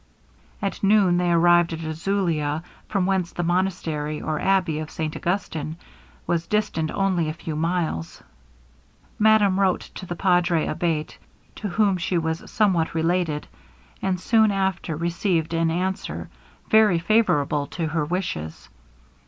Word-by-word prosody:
At 195 - -2
noon 195 -3 +4
they 175 -1 +1
arrived 175 0 +4
at 165 0 -5
Azulia, 160 -2 -1 0.3
from 195 -4 +1
whence 190 -2 0
the 175 - -3
monastery, 165 -4 -1
or 155 -1 -2
abbey 185 -5 +1
of 155 0 -5
St 155 -1 -4
Augustin, 165 -4 -3 0.5
was 170 -1 -1
distant 165 -7 0
only 185 -4 0
a - - -3
few 160 -1 -6
miles. 160 - -2 1.0
Madame 210 -3 +4
wrote 190 -2 +2
to 185 - -8
the 175 - -4
Padre 175 -2 +2
Abate, 155 -1 -2 0.4
to 210 - -4
whom 200 0 +2
she 175 +1 -1
was 160 0 -2
somewhat 185 -7 +1
related, 165 -2 0 0.6
and 185 -2 0
soon 220 +3 +4
after 190 -4 -1
received 170 0 -1
an 165 0 +2
answer 185 +4 -3 0.4
very 215 -5 +5
favourable 160 -7 +2
to 170 - -3
her 155 0 0
wishes. 150 - -4
175 Hz, 135 wpm, -24 LUFS, 160-190 Hz, 1.0 s, very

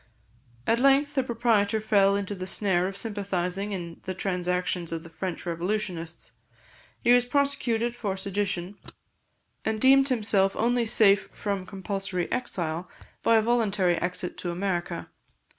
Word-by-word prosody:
At 230 +1 +2
length 275 +2 +4
the 275 - +2
proprietor 225 -4 +1
fell 200 -2 +3
into 200 0 -2
the 185 -2 -6
snare 185 -2 +1
of 195 0 -6
sympathising 200 -2 -2
in 170 -4 -5
the 185 -1 -3
transactions 180 -2 -1
of 165 -1 -4
the 165 - -12
French 180 +1 -5
revolutionists; 170 -1 -3 0.7
he 240 - +6
was 245 0 +5
prosecuted 245 -3 0
for 200 -5 -3
sedition, 190 -1 -3 0.8
and 220 0 -1
deemed 270 +3 +6
himself 205 -5 +2
only 240 +1 +1
safe 200 -3 +4
from 200 -3 -3
compulsory 195 -2 -3
exile 175 -8 -2 0.3
by 230 - +4
a 220 - +3
voluntary 205 -7 +2
exit 180 0 -3
to 175 - -3
America. 175 -1 -2
200 Hz, 140 wpm, -27 LUFS, 180-225 Hz, 0.8 s, he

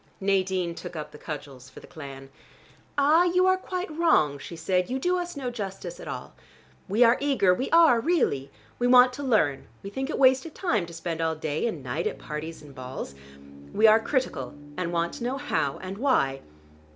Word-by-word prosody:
Nadine 190 -3 0
took 175 +1 -8
up 155 -1 -6
the 150 - -12
cudgels 140 -4 -8
for - - -12
the - - -14
clan. 135 -4 -10 0.7
"Ah, 305 +5 +5
you 360 +1 +3
are 375 0 +5
quite 365 -3 -5
wrong," 155 - +3
she 170 - -8
said. 180 +3 0
"You 260 - -1
do 355 +7 +1
us 350 -3 -5
no 255 -3 -3
justice 210 - -6
at - - -9
all. - - -6 0.6
We 215 +5 +4
are 235 +1 +5
eager, 270 -10 +3
we 255 +9 -2
are, 330 -8 +6
really: 230 - +1 0.3
we 245 - +2
want 250 0 +7
to 285 - -6
learn, 185 - +1 0.2
we 195 - -7
think 265 +6 -3
it - - -2
waste 260 -1 +5
of 315 - -13
time 215 - 0
to 170 - -11
spend 165 -1 -4
all 160 0 0
day 155 +5 -2
and 165 - -4
night 130 +7 -2
at - - -4
parties 155 +1 -7
and 145 -2 -13
balls. 130 - -7 0.6
We 220 - +3
are 220 0 +7
critical, 225 - -2 0.2
and 180 -1 -2
want 170 0 -1
to - - -7
know 255 +3 -1
how 215 - -1
and 190 +2 -6
why. 135 - +2
195 Hz, 205 wpm, -26 LUFS, -, 0.7 s, want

